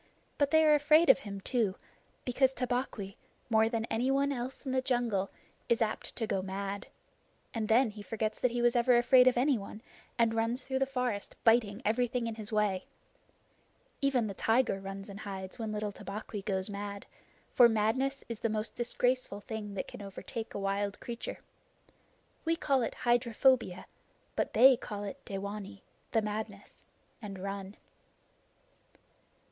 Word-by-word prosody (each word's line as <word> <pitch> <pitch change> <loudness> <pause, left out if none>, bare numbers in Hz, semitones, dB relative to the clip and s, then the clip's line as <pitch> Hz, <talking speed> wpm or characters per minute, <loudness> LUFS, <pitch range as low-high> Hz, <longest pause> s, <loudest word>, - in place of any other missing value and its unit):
But 285 -1 +3
they 315 +1 +5
are 305 - +6
afraid 300 +1 +6
of 265 - +1
him 200 -5 -7
too, 220 -4 0 0.5
because 260 +1 +3
Tabaqui, 245 -6 -2 0.3
more 220 0 +4
than 230 -1 -1
anyone 270 +5 +1
else 260 +2 -5
in 265 - -2
the 260 0 +2
jungle, 240 -7 0 0.4
is 235 - +3
apt 220 -2 -2
to 225 - -1
go 195 -3 -1
mad, 195 +1 -4 0.7
and 220 -2 -2
then 230 +1 +4
he 210 0 -10
forgets 215 +1 -3
that 250 - +3
he 240 0 -1
was 240 +1 +4
ever 240 0 +5
afraid 250 +1 +6
of 250 - +4
anyone, 245 -6 0 0.4
and 230 -2 +3
runs 230 +3 0
through 265 0 -2
the 270 - +1
forest 250 -6 -2
biting 225 -1 +3
everything 245 +2 +1
in 230 - -2
his 215 -1 -7
way. 210 -3 +1 1.2
Even 270 -4 +2
the 205 - -3
tiger 225 0 +2
runs 195 0 -7
and 200 0 -8
hides 190 -1 -7
when 220 -2 -3
little 210 -1 -2
Tabaqui 205 +1 -6
goes 190 -1 -1
mad, 200 -1 -5 0.5
for 240 -2 +7
madness 245 +6 0
is 230 -2 -5
the 230 - 0
most 215 +1 -2
disgraceful 245 -3 0
thing 210 -1 -6
that - - -3
can - - -9
overtake 210 +3 -6
a - - -2
wild 200 +1 -1
creature. 235 -1 -6 1.0
We 330 +1 +1
call 275 -5 +1
it 230 - -2
hydrophobia, 240 -4 +3 0.5
but - - -1
they 255 +2 +8
call 205 -3 -6
it 200 - -7
dewanee 200 0 -6 0.3
the 225 -2 +2
madness 210 -1 -5 0.4
and 200 -3 -6
run. 195 +1 -5
225 Hz, 160 wpm, -31 LUFS, 205-250 Hz, 1.2 s, they